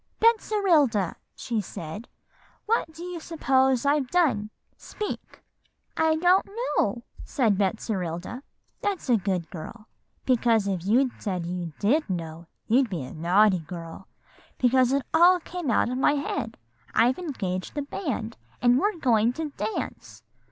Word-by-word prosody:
"'Betserilda,' 355 Hz, -, +3 dB, 0.2 s
she 230 Hz, -3 st, -2 dB
said, 175 Hz, +4 st, -8 dB, 0.6 s
'what 440 Hz, -6 st, 0 dB
do 325 Hz, +2 st, -10 dB
you 355 Hz, -1 st, -5 dB
suppose 265 Hz, -5 st, +1 dB
I've 285 Hz, -2 st, +2 dB
done? 275 Hz, -13 st, +2 dB, 0.3 s
Speak.' 420 Hz, -2 st, -7 dB, 0.5 s
"'I 320 Hz, 0 st, +3 dB
don't 360 Hz, +4 st, +3 dB
know,' 295 Hz, -, -1 dB, 0.2 s
said 225 Hz, -7 st, +1 dB
Betserilda. 190 Hz, 0 st, -2 dB, 0.4 s
"'That's 395 Hz, -8 st, -2 dB
a 235 Hz, -, +5 dB
good 185 Hz, -4 st, -2 dB
girl, 215 Hz, +7 st, -9 dB, 0.4 s
because 230 Hz, -4 st, +3 dB
if 190 Hz, -4 st, -2 dB
you'd 250 Hz, +4 st, +3 dB
said 185 Hz, -5 st, -2 dB
you 175 Hz, -1 st, -4 dB
did 270 Hz, +6 st, +1 dB
know, 165 Hz, -2 st, -5 dB, 0.2 s
you'd 250 Hz, +2 st, +3 dB
be 170 Hz, -8 st, -3 dB
a 130 Hz, -, -8 dB
naughty 185 Hz, +4 st, +3 dB
girl, 165 Hz, +2 st, -9 dB, 0.5 s
because 255 Hz, 0 st, +3 dB
it 275 Hz, 0 st, +1 dB
all 350 Hz, +3 st, +6 dB
came 350 Hz, -3 st, -5 dB
out 235 Hz, -, +2 dB
of 250 Hz, +1 st, -2 dB
my 285 Hz, -, +4 dB
head. 280 Hz, -5 st, -3 dB, 0.4 s
I've 250 Hz, +5 st, +3 dB
engaged 195 Hz, -, -4 dB
the 290 Hz, -, -1 dB
band, 270 Hz, -, -4 dB, 0.2 s
and 245 Hz, +1 st, +4 dB
we're 410 Hz, +1 st, 0 dB
going 235 Hz, -5 st, +3 dB
to 315 Hz, +2 st, -4 dB
dance. 195 Hz, -, -5 dB
240 Hz, 140 wpm, -26 LUFS, 195-305 Hz, 0.6 s, all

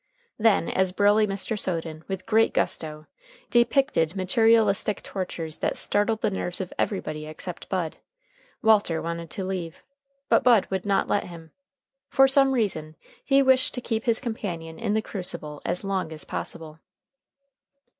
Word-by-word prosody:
Then, 215 Hz, -6 st, +3 dB
as 190 Hz, -1 st, +1 dB
burly 205 Hz, +2 st, +3 dB
Mr. 200 Hz, +2 st, -2 dB
Soden, 165 Hz, -4 st, -3 dB
with 190 Hz, -1 st, -5 dB
great 225 Hz, 0 st, +3 dB
gusto, 155 Hz, -1 st, -2 dB, 0.5 s
depicted 235 Hz, -, +2 dB
materialistic 210 Hz, +1 st, +3 dB
tortures 170 Hz, -4 st, -5 dB
that -, -, -1 dB
startled 215 Hz, +2 st, +1 dB
the 215 Hz, -, +1 dB
nerves 180 Hz, -2 st, -1 dB
of 185 Hz, -2 st, -5 dB
everybody 155 Hz, -6 st, -2 dB
except 170 Hz, +3 st, -8 dB
Bud, 175 Hz, -5 st, -2 dB, 0.7 s
Walter 210 Hz, -7 st, +4 dB
wanted 170 Hz, 0 st, -5 dB
to 190 Hz, -, -5 dB
leave, 185 Hz, -3 st, -5 dB, 0.4 s
but -, -, +3 dB
Bud 235 Hz, -5 st, +5 dB
would 190 Hz, +1 st, -2 dB
not 200 Hz, -1 st, +2 dB
let 205 Hz, -, 0 dB
him. 165 Hz, -2 st, -11 dB, 0.6 s
For 270 Hz, -1 st, +5 dB
some 270 Hz, 0 st, +4 dB
reason 160 Hz, -10 st, -1 dB, 0.3 s
he 275 Hz, 0 st, +4 dB
wished 260 Hz, -1 st, +3 dB
to -, -, -2 dB
keep 225 Hz, -2 st, -2 dB
his 230 Hz, -2 st, +2 dB
companion 175 Hz, -10 st, -5 dB
in 210 Hz, -, -1 dB
the 220 Hz, -, 0 dB
crucible 170 Hz, -8 st, -4 dB
as 180 Hz, -, -1 dB
long 195 Hz, -4 st, -2 dB
as 155 Hz, -2 st, -6 dB
possible. 160 Hz, -1 st, -6 dB
190 Hz, 150 wpm, -25 LUFS, 165-220 Hz, 0.7 s, Bud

